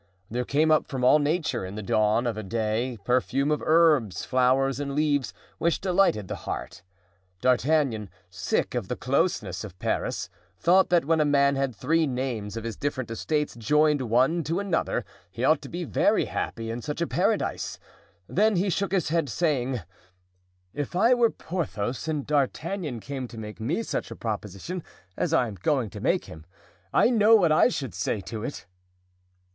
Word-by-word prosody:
There 125 +2 -1
came 155 +4 +2
up 155 - +3
from 130 -2 -4
all 130 +4 +6
nature 150 - 0
in 95 +2 -6
the 105 - -5
dawn 110 +4 +2
of 110 -4 -3
day 115 +3 -1
a - - -13
perfume 130 +6 0
of 150 - 0
herbs, 155 - +3
flowers 130 +1 +2
and 140 -1 -3
leaves, 145 -3 +1 0.3
which 170 0 +1
delighted 180 - +2
the - - -4
heart. 85 - -5 0.6
D'Artagnan, 125 -4 +1 0.2
sick 90 +1 -1
of - - -2
the - - -2
closeness - - 0
of 95 -4 -9
Paris, - - -2 0.3
thought 185 - +4
that 175 -4 +3
when 160 +1 +2
a - - +5
man 140 -1 +3
had 135 -3 -1
three 165 +7 +1
names 125 -5 -3
of 115 - -5
his 115 -1 -4
different 130 -5 -3
estates 150 +6 -1
joined 150 +5 +2
one 130 +9 +3
to 165 +6 -1
another, 200 -4 -1 0.2
he - - -6
ought - - +4
to - - -9
be - - -4
very - - +2
happy 115 0 -4
in 120 +1 -4
such 150 +5 -4
a 170 - +1
paradise; - - -1 0.5
then 215 +2 +2
he 190 +2 +1
shook 200 +2 -1
his 180 -6 +1
head, 165 -3 0
saying, 130 - 0 0.9
"If 145 +4 -4
I 225 +7 +5
were 240 -2 +4
Porthos 150 - -4
and 150 -3 -2
D'Artagnan 150 - -1
came 135 -1 -5
to 115 - -12
make 105 0 -8
me 145 - -1
such - - -3
a - - -7
proposition 110 - -5 0.3
as 170 - -1
I 130 -7 +3
am 105 -3 -8
going 130 -7 +1
to - - -8
make - - +1
to - - -14
him, 80 0 -11 0.5
I 240 - +4
know 225 -1 +6
what 175 -7 +4
I 155 - +6
should 135 - -4
say 95 +4 -1
to 110 +2 -6
it." 120 - -6
135 Hz, 185 wpm, -26 LUFS, 115-160 Hz, 0.9 s, all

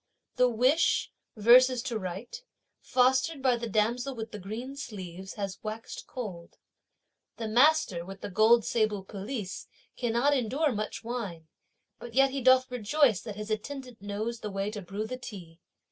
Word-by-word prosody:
The 250 0 +5
wish, 255 +8 +2 0.3
verses 245 +3 +6
to 235 -4 -2
write, 195 - -6 0.4
fostered 260 +4 +2
by 260 -2 +3
the 235 -1 -4
damsel 235 +5 0
with 225 -1 -6
the 210 - -7
green 225 +8 -6
sleeves, 190 -8 -7
has 200 -2 -4
waxéd 220 +2 -7
cold. 190 -9 -7 0.8
The 225 - -3
master, 245 - +4
with 195 +2 -10
the - - -6
gold 220 +3 +5
sable 215 -4 0
pelisse, 205 0 -5 0.3
cannot 245 +4 +2
endure 270 +5 +1
much 215 0 -4
wine. 205 -10 -5 0.5
But 240 -1 -9
yet 270 0 +5
he 275 0 -3
doth 255 0 +5
rejoice 250 - +2
that 215 -3 -7
his 210 +1 -6
attendant 250 +1 -5
knows 215 +3 -3
the 210 - -5
way 195 +1 -2
to 210 -1 -6
brew 195 +4 -4
the 255 +3 -5
tea. 175 -9 -10
225 Hz, 160 wpm, -29 LUFS, 205-255 Hz, 0.8 s, verses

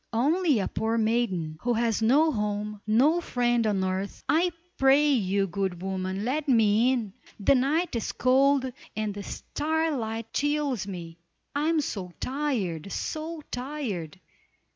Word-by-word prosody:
"Only 300 +5 +2
a 195 - 0
poor 225 +1 -1
maiden, 210 -9 0
who 245 0 +1
has 230 -1 +1
no 285 +8 +4
home, 210 -2 -3
no 280 +11 +4
friend 240 -6 +1
on 195 -3 +1
earth. 190 +1 -3
I 340 +3 +3 0.3
pray 275 +2 +5
you, 200 -7 +2
good 190 -1 -3
woman, 190 +1 -3
let 285 +4 -1
me 225 0 +4
in. 225 -7 -2 0.3
The 205 - +4
night 280 +5 +1
is 230 - -2
cold, 270 +2 +3 0.3
and 215 -1 -2
the 205 - -6
starlight 270 -6 -2
chills 290 -7 0
me. 170 -3 -7 0.4
I 295 +2 +1
am 325 -2 +2
so 185 -10 -5
tired! 220 - -2
so 315 0 -4
tired! 245 - -4
230 Hz, 140 wpm, -27 LUFS, 200-285 Hz, 0.4 s, pray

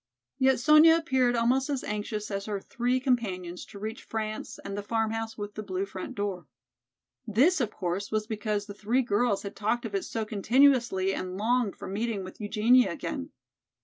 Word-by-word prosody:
Yet 265 -1 +4
Sonya 305 +4 +7
appeared 265 -7 +2
almost 255 +4 +2
as 280 -3 -1
anxious 210 0 -4
as 200 +1 -3
her 205 -2 -2
three 245 +5 -1
companions 190 -9 -1
to - - -12
reach 220 +3 -5
France 215 -1 -4
and 200 - -4
the 205 - -3
"Farmhouse 225 +1 -2
with 205 -1 -5
the 215 - -5
Blue 195 -2 -3
Front 190 -1 -7
Door." 195 -6 -3 0.8
This, 275 - +3
of 235 - 0
course, 190 +1 -3
was 215 -1 -1
because 210 -1 -2
the 205 - -8
three 230 +6 0
girls 205 -1 +1
had 200 0 -6
talked 235 +3 -1
of 215 - -5
it 195 - 0
so 225 -1 -3
continuously 230 -3 +3
and 185 - -3
the 180 - -6
longed 225 +1 +1
for - - -8
meeting 210 0 -2
with 185 +3 -10
Eugenia 230 +4 +4
again. 285 -1 -5
215 Hz, 185 wpm, -28 LUFS, 200-245 Hz, 0.8 s, Sonya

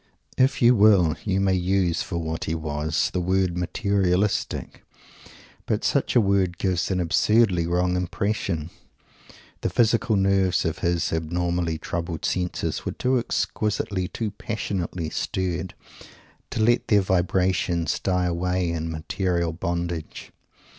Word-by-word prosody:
If 130 -1 +2
you 120 +1 +7
will, 100 -7 +5
you 95 -2 +1
may 95 -1 +2
use, 90 -2 +1
for 85 - -4
what 80 -1 -3
he 80 - -1
was, 75 0 -1
the 90 - -1
word 95 0 +1
"materialistic"; 95 +1 -1 0.8
but - - 0
such - - +1
a - - +7
word 95 -4 +1
gives 90 -2 0
an 95 -1 0
absurdly 90 0 +3
wrong 90 +1 +1
impression. 90 -3 -2 0.9
The - - 0
physical 115 -1 +2
nerves 95 -2 +2
of 80 - -2
his 85 -2 0
abnormally 85 +1 -1
troubled 85 -1 -4
senses, 90 -1 -2
were - - -3
too 125 0 +1
exquisitely, 105 -5 -1
too 110 +2 -4
passionately 90 -6 -4
stirred, 95 -1 -3 0.7
to 110 - -1
let 120 +2 +3
their 105 -2 +4
vibrations 90 -2 +1
die 90 -1 0
away 90 0 0
in 80 0 -3
material 85 +1 -1
bondage. 85 -2 -4
90 Hz, 130 wpm, -24 LUFS, 85-100 Hz, 0.9 s, you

